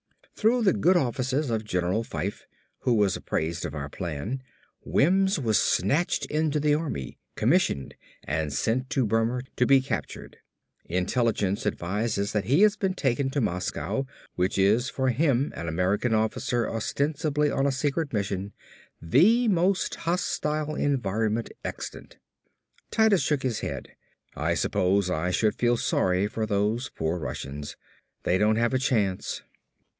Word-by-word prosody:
"Through 230 +2 +2
the 190 - +4
good 180 +3 +3
offices 130 0 0
of 110 -1 -1
General 90 +1 0
Fyfe, - - -5 0.3
who 125 - +1
was 105 -3 +2
apprised 85 +2 -2
of 75 - -4
our 70 -1 -4
plan, 90 - -4 0.4
Wims 190 +5 +3
was 115 -7 +2
snatched 145 - +1
into 155 -1 0
the 150 0 +2
Army, 145 - -3 0.2
commissioned 70 -1 +1 0.3
and 75 0 -2
sent 125 - 0
to 130 - +1
Burma 115 +3 +1 0.2
to 125 - +3
be 135 -1 +6
captured. 130 - -5 0.5
Intelligence 100 +2 0
advises 105 +2 -1
that 105 -2 -1
he 145 - +4
has 210 -1 +5
been 190 -2 -1
taken 135 -3 0
to 140 - -1
Moscow 105 +7 -2 0.3
which 90 +2 0
is 105 +7 +3
for 130 -1 0
him, 135 +1 +1
an 85 - -5
American 95 +8 +1
officer 110 +2 0
ostensibly 150 +5 0
on 135 +1 +1
a - - +2
secret 145 +3 -1
mission, 100 -2 -2 0.5
the 200 - +4
most 185 0 +2
hostile 155 -3 -1
environment 115 -6 0
extant." - - -7 0.7
Titus 220 -4 +4
shook 145 -3 0
his 120 -4 -1
head. - - -5 0.5
"I - - 0
suppose 95 +1 +1
I 90 +1 0
should 105 +4 +2
feel 120 0 +1
sorry 95 -3 +1
for 110 +1 -2
those 105 +5 0
poor 80 +2 -2
Russians. 70 0 -6 0.5
They 90 +1 +2
don't 105 +1 +3
have 115 +2 +1
a 130 - +2
chance." 105 -8 0
115 Hz, 145 wpm, -26 LUFS, 100-145 Hz, 0.7 s, be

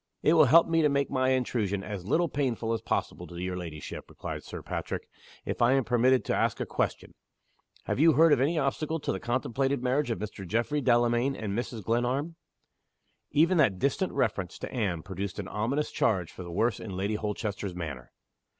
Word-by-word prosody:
"It 155 - +5
will 160 -3 +7
help 165 +6 +7
me 165 0 +2
to 150 - +4
make 140 0 0
my 130 -1 +2
intrusion 115 -6 0
as 100 -3 -6
little 170 +9 +2
painful 125 -6 -1
as 115 - -2
possible - - -2
to 85 - -11
your 90 +1 -3
ladyship," 80 -4 -7
replied - - -6
Sir - - -8
Patrick, - - -4 0.4
"if - - -3
I 120 +2 +5
am 135 -1 +3
permitted 125 +2 +3
to - - 0
ask - - +1
a - - -1
question. - - -2 0.7
Have - - -2
you 160 +1 +6
heard 160 +2 +6
of 125 - +3
any 155 +5 +2
obstacle 155 +3 -1
to - - -2
the 95 - -3
contemplated 130 +3 -1
marriage 130 +2 +1
of 115 - -1
Mr. 105 -2 -6
Geoffrey 115 - 0
Delamayn 120 +2 +2
and 100 -3 -4
Mrs. 115 -2 -4
Glenarm?" 125 - 0 0.9
Even 165 +4 +3
that 110 -11 +4
distant 140 - 0
reference 95 -4 -1
to - - -7
Anne 95 -10 -1
produced 95 +1 -5
an 100 -3 -4
ominous 130 +10 -1
change 90 -6 +1
for - - -10
the 90 - -7
worse 110 +5 +1
in 100 -5 -6
Lady 100 +3 -1
Holchester's 105 -2 -3
manner. 75 -8 -6
120 Hz, 195 wpm, -28 LUFS, 100-140 Hz, 0.9 s, will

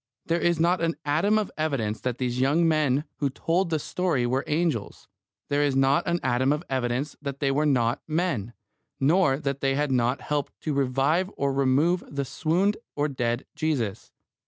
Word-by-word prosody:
There 170 +1 +1
is 170 -2 +2
not 175 +2 +2
an 165 0 0
atom 165 +9 +2
of 215 -2 -1
evidence 115 -9 -1
that 125 -1 -2
these 125 -1 -2
young 150 +6 +3
men 150 -3 +2
who 140 - 0
told 170 +7 0
the 160 - +1
story 155 -4 -1
were 130 +3 0
angels. 155 -9 -1 0.4
There 145 0 +1
is 145 -2 +1
not 135 +5 +3
an 170 0 +1
atom 130 +1 +2
of 150 +3 -1
evidence 130 +2 -1
that 140 -1 -5
they 140 -1 +1
were 150 +3 +1
not 120 -4 +1
men, 155 - -1 0.5
nor 145 0 +3
that 140 -2 -3
they 135 0 +1
had 145 -1 0
not 125 +1 +1
helped 145 -1 -3
to 155 - -2
revive 140 +7 +1
or 140 0 +1
to 135 - -2
remove 145 +7 +2
the 140 -1 -3
swooned 175 +9 0 0.2
or 150 +1 0
dead 120 -2 -2
Jesus. 150 -10 -2
140 Hz, 185 wpm, -26 LUFS, 130-160 Hz, 0.5 s, young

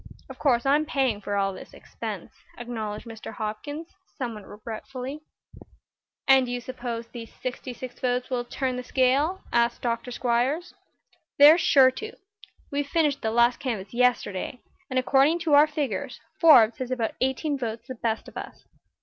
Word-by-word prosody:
Of - - -10
course 245 -4 +2
I'm 295 +3 +3
paying 260 -9 0
for 205 0 -3
all 195 -1 +1
this - - -11
expense," - - -7 0.3
acknowledged 220 -3 -5
Mr. 225 -2 -8
Hopkins, 290 +10 -5 0.3
somewhat 225 -7 -5
regretfully. 250 +6 -7 1.1
"And 265 -1 +6
do - - -4
you 245 - -2
suppose 240 -2 -5
these 230 -1 -10
sixty 255 0 -6
six 250 0 -9
votes 250 0 -1
will 245 -1 0
turn 255 +1 -3
the 250 - -4
scale?" 275 +8 +2
asked 235 0 +2
Dr. 235 0 -2
Squiers. 250 +8 0 0.6
"They're 300 +4 +9
sure 265 -5 +6
to. 435 +12 -7 0.6
We 285 0 0
finished 290 -1 0
the 220 - 0
last 235 +2 +3
canvass 215 -7 -4
yesterday, 245 -2 0 0.3
and 260 - -2
according 270 +5 +4
to 320 -3 +1
our 290 +2 +8
figures 285 -10 -3 0.2
Forbes 280 -8 +7
has 255 -1 -3
about 240 -4 -1
eighteen 265 +3 0
votes 230 -3 -5
the 260 - -5
best 225 -2 -2
of - - -13
us. - - -8
250 Hz, 160 wpm, -26 LUFS, 230-275 Hz, 1.1 s, They're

